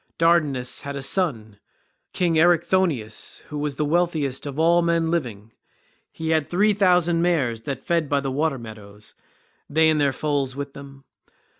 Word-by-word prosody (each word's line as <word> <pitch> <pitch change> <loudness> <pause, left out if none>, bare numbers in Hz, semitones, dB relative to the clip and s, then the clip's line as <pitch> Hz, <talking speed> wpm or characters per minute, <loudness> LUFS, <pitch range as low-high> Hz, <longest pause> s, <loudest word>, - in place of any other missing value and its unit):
Dardanus 150 -7 +1
had 140 0 -6
a 140 - -4
son, 115 - -1 0.5
king 175 -2 0
Erichthonius, 170 - +1
who 150 - -5
was 145 -2 -3
wealthiest 150 -3 0
of 140 0 -6
all 170 +2 +4
men 170 -1 +1
living; 115 -10 -3 0.6
he 160 0 -5
had 155 -2 +1
three 205 +4 +3
thousand 180 -4 +3
mares 140 -10 0
that 135 -2 -5
fed 165 -4 0
by 145 - +2
the 135 -1 -3
water 150 +1 0
meadows, 105 -3 -12 0.6
they 160 +2 +3
and 155 -1 +1
their 140 -1 +3
foals 140 -1 -2
with 140 0 -6
them. 140 -1 -12
150 Hz, 155 wpm, -23 LUFS, 135-170 Hz, 0.6 s, all